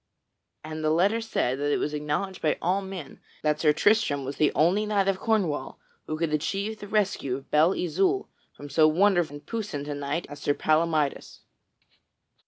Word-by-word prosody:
And 155 0 -6
the 155 - +2
letter 195 +8 +2
said 135 - -1
that 145 0 0
it - - +2
was 150 - -2
acknowledged 150 +6 -3
by 155 - +1
all 185 +3 +1
men 190 -7 -8 0.2
that 150 0 +1
Sir 155 -2 +4
Tristram 155 -5 +2
was 135 - -5
the 150 - +3
only 190 +7 +3
knight 200 -2 +1
of 195 -1 +1
Cornwall 185 - -1 0.3
who 155 - -3
could 160 -1 -1
achieve 200 +8 -2
the 205 - -8
rescue 195 -11 0
of 135 - -15
Belle 160 +5 +4
Isoult 190 - 0 0.2
from 145 - -11
so 155 +2 +4
wonderful 175 -2 +2
and 145 - -11
puissant 205 -11 -4
a 145 - -3
knight 145 +4 -3
as 145 0 -10
Sir 145 - +1
Palamydes. 155 -2 0
160 Hz, 185 wpm, -26 LUFS, 150-195 Hz, 0.3 s, Sir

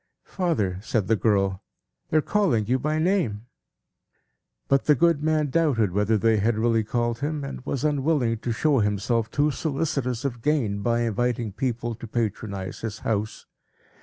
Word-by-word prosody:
"Father," 110 - -1
said 110 -2 -1
the 115 - +3
girl, 100 -3 +1 0.5
"they 155 - +2
are - - +4
calling 175 - +1
you 125 +4 +1
by 150 +4 -1
name." 155 - 0 1.2
But 135 -1 +2
the 150 - +5
good 170 0 +3
man 155 -2 +1
doubted 135 - +2
whether 105 +3 +2
they 110 +1 +3
had 110 +2 +1
really 115 0 +2
called 120 +1 -1
him, 145 +1 -2
and 140 -2 -6
was 140 - -2
unwilling 140 -6 +1
to 120 - -3
show 140 +4 +2
himself 110 +2 0
too 145 +5 +1
solicitous 140 -4 -2
of 120 -4 -3
gain, 115 -9 0
by 120 +2 +1
inviting 120 0 -1
people 120 +2 -2
to 115 +1 -9
patronize 105 -4 -3
his 110 -2 -5
house. 110 -1 -2
120 Hz, 165 wpm, -25 LUFS, 110-145 Hz, 1.2 s, the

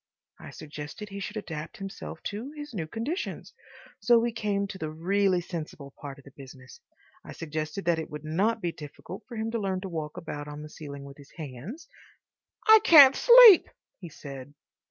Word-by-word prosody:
I - - -10
suggested 150 +8 -9
he 200 0 -7
should 210 +3 -6
adapt 160 -7 -7
himself 195 0 -8
to 220 +6 -5
his 295 -3 -9
new 165 -7 -4
conditions. 250 - -5 0.5
So 240 -1 +4
we 235 +1 +1
came 205 -3 -1
to 195 -1 -8
the 155 - -4
really 185 +3 +1
sensible 155 -5 -7
part 140 -1 -8
of 140 - -16
the 140 - -15
business. 130 -2 -13 0.4
I - - -10
suggested 155 +3 -5
that 170 -1 +2
it 160 - -6
would 150 0 -8
not 205 +9 0
be 175 - -1
difficult 160 +4 -10
for 240 - -9
him 220 +1 -3
to 230 - -2
learn 190 -2 -2
to 190 - -6
walk 155 -3 -5
about 145 -3 -6
on 150 0 -8
the 150 - -10
ceiling 140 -2 -9
with 140 0 -12
his 145 -1 -16
hands— 160 - -8 0.8
"I 440 0 +9
can't 280 -7 +9
sleep," 475 -6 +8 0.3
he 175 - -9
said. 140 -2 -10
175 Hz, 190 wpm, -27 LUFS, 150-220 Hz, 0.8 s, I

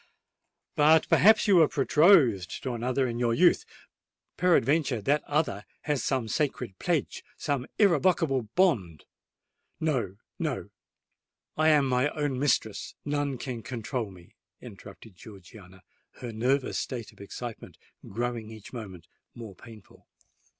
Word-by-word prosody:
"But 155 +2 +4
perhaps 220 +2 +5
you 195 -3 +5
were 160 -3 +6
betrothed 140 - +3
to 130 - -3
another 125 +3 -1
in 120 0 -4
your 120 -1 +1
youth:—peradventure 170 - 0
that 145 +7 0
other 145 -9 -1 0.2
has 145 -3 -1
some 130 -4 -1
sacred 125 -5 -2
pledge—some 145 -4 -3
irrevocable 165 - +2
bond——" 110 - +1 0.7
"No—no: 120 - -3 0.8
I 155 +1 +3
am 150 -3 +4
my 130 +2 +1
own 145 -4 -1
mistress—none 145 +2 -1
can 120 -2 -6
control 115 0 -4
me!" 90 -3 -16 0.3
interrupted 105 -2 -13
Georgiana, 95 -2 -14 0.3
her 120 -2 -7
nervous 130 +4 0
state 120 -5 -5
of - - -18
excitement 115 +3 -8 0.3
growing 115 0 -3
each 110 0 -12
moment 100 -8 -8 0.3
more 115 -4 -9
painful. 110 +1 -16
125 Hz, 115 wpm, -27 LUFS, 110-150 Hz, 0.8 s, were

